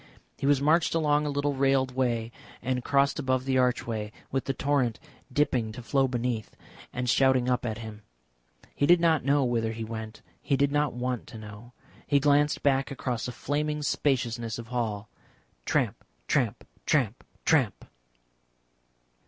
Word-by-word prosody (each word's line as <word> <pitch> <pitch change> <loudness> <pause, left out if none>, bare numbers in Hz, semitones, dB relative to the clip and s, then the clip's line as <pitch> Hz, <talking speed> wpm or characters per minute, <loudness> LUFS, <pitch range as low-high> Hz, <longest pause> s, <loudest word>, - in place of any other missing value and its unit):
He - - -1
was 145 -2 +4
marched 165 +3 +3
along 150 -2 +2
a - - 0
little 145 0 0
railed 135 -1 +2
way, 120 -3 0 0.3
and 125 0 -1
crossed 140 +1 +2
above 130 -2 0
the 130 -1 +2
archway, 115 -4 0 0.2
with 135 -1 -1
the 135 - -1
torrent 135 -5 0 0.3
dipping 125 -5 +1
to 125 - -8
flow 135 +2 +2
beneath, 120 -3 -3 0.4
and 125 0 -3
shouting 130 0 +3
up 125 -1 +1
to 110 -3 -3
him. 110 -1 -8 0.7
He 145 - +1
did 175 0 +7
not 165 -2 +3
know 140 0 +3
whither 115 -2 0
he 115 0 -5
went; 110 0 -7 0.2
he 140 - +1
did 140 0 +2
not 145 -1 +1
want 125 0 -3
to - - -10
know. 110 +3 -11 0.3
He 145 - +4
glanced 145 +1 +3
back 135 -1 +2
across 125 -3 -3
a - - -4
flaming 150 +4 -2
spaciousness 120 -6 0
of 115 -1 -8
hall. 115 -4 -2 0.6
Tramp, - - 0 0.2
tramp, - - 0 0.2
tramp, 125 -6 +1 0.2
tramp. 135 - +2
130 Hz, 160 wpm, -28 LUFS, 115-140 Hz, 0.7 s, did